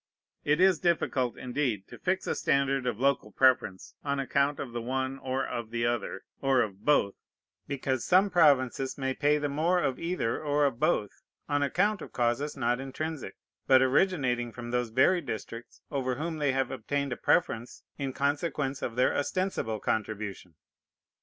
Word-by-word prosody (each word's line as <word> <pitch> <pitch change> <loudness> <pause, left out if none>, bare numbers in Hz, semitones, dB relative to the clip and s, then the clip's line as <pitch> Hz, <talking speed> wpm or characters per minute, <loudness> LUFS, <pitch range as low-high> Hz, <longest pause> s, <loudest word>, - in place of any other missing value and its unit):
It 150 +2 +2
is 185 -3 +5
difficult, 140 -8 0
indeed, 125 -6 -2
to - - -11
fix 185 0 -1
a - - 0
standard 135 -1 +1
of 115 -3 -2
local 135 -5 +1
preference 120 -6 +2
on 140 -1 -1
account 140 +1 +1
of 130 - -5
the 120 0 -4
one, 130 +2 -2
or 130 0 -2
of 115 -2 -5
the 115 0 -1
other, 120 -5 -2 0.2
or 135 -2 +3
of 100 -1 -7
both, 125 -9 +3 0.5
because 130 -2 -2
some 190 +2 +4
provinces 135 -6 +3
may 135 -1 -1
pay 150 +2 +2
the 145 0 -1
more 160 +6 +1
of 135 -7 -1
either 165 -9 -1
or 145 0 +2
of 135 -4 -1
both 105 -2 +1 0.4
on 145 0 +1
account 190 +8 +1
of - - -9
causes 125 +5 0
not 120 -1 +1
intrinsic, 145 +2 -5 0.3
but 130 0 +6
originating 130 -5 +1
from 120 0 -7
those 125 -1 0
very 130 +10 +3
districts 115 -3 -7
over 130 -3 -1
whom 160 +3 -4
they 145 -2 +2
have 135 0 -1
obtained 140 +2 -2
a - - -4
preference 120 -7 0 0.2
in 135 -2 -2
consequence 140 0 -1
of 115 - -3
their 125 - +2
ostensible 145 - -1
contribution. 105 -5 -3
135 Hz, 170 wpm, -29 LUFS, 120-145 Hz, 0.5 s, but